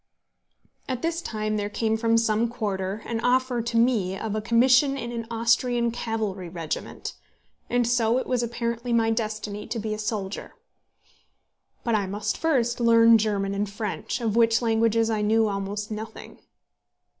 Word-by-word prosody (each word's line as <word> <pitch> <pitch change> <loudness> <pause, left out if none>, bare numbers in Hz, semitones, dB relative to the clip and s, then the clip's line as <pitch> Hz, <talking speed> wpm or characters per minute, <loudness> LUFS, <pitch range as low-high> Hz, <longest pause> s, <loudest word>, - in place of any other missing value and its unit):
At 255 -2 -3
this 335 +1 -1
time 215 -6 -2
there 205 0 -2
came 220 +1 0
from 230 0 +2
some 225 0 +2
quarter 205 -3 -3
an 230 -1 -2
offer 250 0 +1
to 230 0 -2
me 220 -6 +2
of 215 +1 -4
a 215 - -1
commission 250 +5 +4
in 235 -2 -5
an 230 -1 -5
Austrian 235 +1 +1
cavalry 215 -6 -3
regiment; 165 -2 -5 0.6
and 245 0 +2
so 235 -1 +2
it 260 - -1
was 250 -2 0
apparently 235 0 -2
my 225 -1 +3
destiny 215 -2 -3
to 235 - -3
be 215 -1 -2
a 215 - -5
soldier. 210 -2 -4 1.3
But 235 - 0
I 205 -3 +1
must 205 +2 -2
first 250 -7 +1
learn 230 -1 +6
German 200 -2 0
and 200 0 -1
French, 210 +3 -4
of 225 -2 0
which 230 0 +4
languages 225 -1 +2
I 215 -1 0
knew 220 +1 +3
almost 205 +1 -3
nothing. 220 +1 -8
225 Hz, 160 wpm, -25 LUFS, 210-235 Hz, 1.3 s, learn